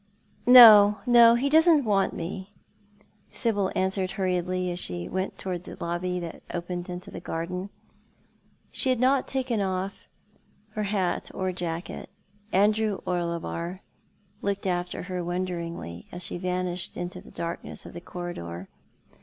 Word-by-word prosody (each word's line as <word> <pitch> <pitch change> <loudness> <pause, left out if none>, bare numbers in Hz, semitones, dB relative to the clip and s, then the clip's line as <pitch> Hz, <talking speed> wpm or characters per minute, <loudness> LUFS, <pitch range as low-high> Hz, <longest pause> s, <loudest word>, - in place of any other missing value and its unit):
" - - -34
No, 215 -5 +10
no, 235 -1 +7
he 255 +4 +1
doesn't 315 -1 +5
want 200 -3 +1
me," 190 +3 -6 0.8
Sibyl 205 -5 0
answered 190 0 0
hurriedly, 185 -1 -1
as 175 - -4
she 90 - -4
went 185 +1 -3
towards 180 -2 -4
the - - -9
lobby 180 +1 -2
that 170 -2 -7
opened 175 +1 -4
to 180 0 -7
the - - -7
garden. 180 +4 -4 1.0
She 265 - +1
had 255 -2 +2
not 260 +2 +3
taken 255 -5 -1
off 190 0 -3 0.6
her 215 -1 -3
hat 190 -4 -1
or 185 0 -1
jacket. 175 -1 -5 0.4
Andrew 210 +1 +2
Orlebar 170 +1 -3 0.6
looked 200 -1 -2
after 180 -1 -2
her 180 -1 -4
wonderiugly, 170 - -4
as 175 0 -6
she 175 - -5
vanished 180 -1 -2
in 175 0 -3
the 180 0 -10
darkness 170 0 -6
of - - -10
the 175 - -8
corridor. 95 - -7
185 Hz, 140 wpm, -26 LUFS, 175-205 Hz, 1.0 s, No